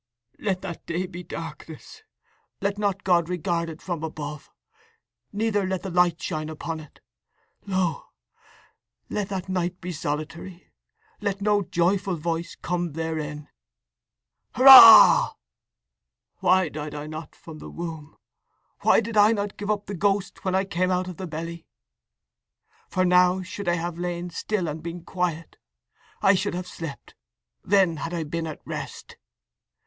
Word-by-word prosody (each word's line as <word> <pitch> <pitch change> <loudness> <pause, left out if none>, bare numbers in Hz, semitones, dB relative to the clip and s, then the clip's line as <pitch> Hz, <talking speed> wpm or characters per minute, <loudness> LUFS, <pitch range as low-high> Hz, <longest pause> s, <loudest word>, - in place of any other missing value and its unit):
_"Let 190 -3 -1
that 175 -4 -7
day 175 +2 -2
be 180 -1 -8
darkness; 165 - -9 0.6
let 200 +1 -2
not 200 -1 -1
God 175 -2 +2
regard 170 -2 -1
it 160 0 -10
from 175 -4 -4
above, 150 -2 -6 0.8
neither 210 -1 0
let 190 -1 -2
the 190 - -5
light 175 -1 +2
shine 155 0 -4
upon 160 +1 -5
it. 155 -2 -15 0.7
Lo, 185 -4 -1 1.0
let 205 -2 -2
that 190 -2 -4
night 180 -1 -2
be 180 - -6
solitary, 155 +4 -6 0.5
let 200 -1 -2
no 205 0 +2
joyful 185 +1 0
voice 165 +1 -3
come 175 -2 -2
therein."_ 155 -2 -4 1.1
("Hurrah!") 260 - +10 1.1
_"Why 185 0 +4
died 150 0 -6
I 145 0 -5
not 155 +1 -8
from 155 -2 -12
the - - -9
womb? 160 -3 -7 0.6
Why - - +4
did 230 0 -6
I 210 +1 +6
not 205 -2 -3
give 205 0 -6
up 205 -1 -1
the 200 - -6
ghost 200 +1 -1
when 185 -1 0
I 190 +1 +1
came 185 -1 -1
out 185 0 0
of 180 - -9
the 185 - -5
belly?… 165 +1 -7 1.2
For 185 -1 +1
now 180 +1 +4
should 200 +1 -7
I 175 - +3
have 170 0 -4
lain 175 0 -4
still 185 +1 -2
and 155 +1 -5
been 170 +1 -7
quiet. 170 -3 -3 0.7
I 195 - +6
should 190 0 -1
have 180 0 -4
slept: 165 -5 -8 0.5
then 190 -4 +3
had 165 +4 -4
I 165 - -2
been 165 +2 -4
at 155 - -9
rest!" - - -7
175 Hz, 150 wpm, -25 LUFS, 165-195 Hz, 1.2 s, Hurrah